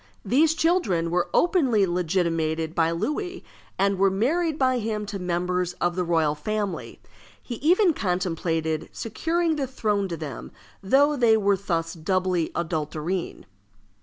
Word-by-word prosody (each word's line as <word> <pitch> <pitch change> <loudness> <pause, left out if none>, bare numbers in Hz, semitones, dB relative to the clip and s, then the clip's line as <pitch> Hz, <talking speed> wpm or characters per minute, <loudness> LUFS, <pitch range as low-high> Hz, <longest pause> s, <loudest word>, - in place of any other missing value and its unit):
These 310 +6 +3
children 220 - +1
were 175 0 0
openly 265 - +3
legitimated 165 -3 -1
by 165 -1 +2
Louis, 355 - -3 0.3
and 195 -1 +1
were 195 0 +5
married 300 - 0
by 255 -3 +2
him 215 -1 -3
to 205 -1 -5
members 180 0 -1
of 175 0 -1
the 180 - 0
royal 165 -3 +2
family. 210 +5 -4 0.4
He 240 - -7
even 350 - +4
contemplated 165 - -1
securing 325 +8 -1
the 275 -2 -1
throne 210 -6 -1
to 170 -2 -5
them, 145 -6 -7 0.3
though 280 +9 +3
they 235 -4 +4
were 200 -1 +2
thus 165 -4 -2
doubly 180 0 0
adulterine. 160 - -3
190 Hz, 135 wpm, -25 LUFS, 170-255 Hz, 0.4 s, were